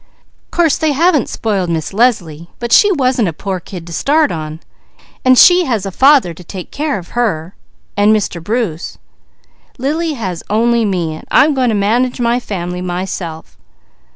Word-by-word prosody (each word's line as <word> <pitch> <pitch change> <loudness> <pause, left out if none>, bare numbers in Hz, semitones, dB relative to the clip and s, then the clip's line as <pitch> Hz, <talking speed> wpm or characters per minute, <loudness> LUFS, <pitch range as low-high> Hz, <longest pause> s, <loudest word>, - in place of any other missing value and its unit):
"Course 335 -5 +1
they 315 -2 +1
haven't 315 -2 +2
spoiled 200 -5 -2
Miss 160 0 -3
Leslie, 175 -8 0
but 235 -1 -5
she 415 - +6
wasn't 255 - +1
a 165 - -3
poor 190 +3 -4
kid 175 0 -9
to 170 - -9
start 295 - +2
on, 155 -1 -5 0.6
and 255 0 +5
she 355 +4 +7
has 225 -8 -1
a 195 - -4
father 265 - +4
to 180 - -13
take 180 +1 -9
care 295 -2 -2
of 175 -3 -10
her, 190 -8 -2 0.4
and 205 +1 +3
Mr. 200 -6 -1
Bruce. 205 -5 -3 0.8
Lily 310 +5 -1
has 190 - -5
only 230 +2 +2
me 175 -5 -1
and 155 - -11
I'm 300 +2 +4
going 260 -3 +1
to 220 - 0
manage 235 +6 0
my 240 0 +1
family 180 -6 -5
myself. 175 -2 -5
215 Hz, 170 wpm, -15 LUFS, 175-255 Hz, 0.8 s, she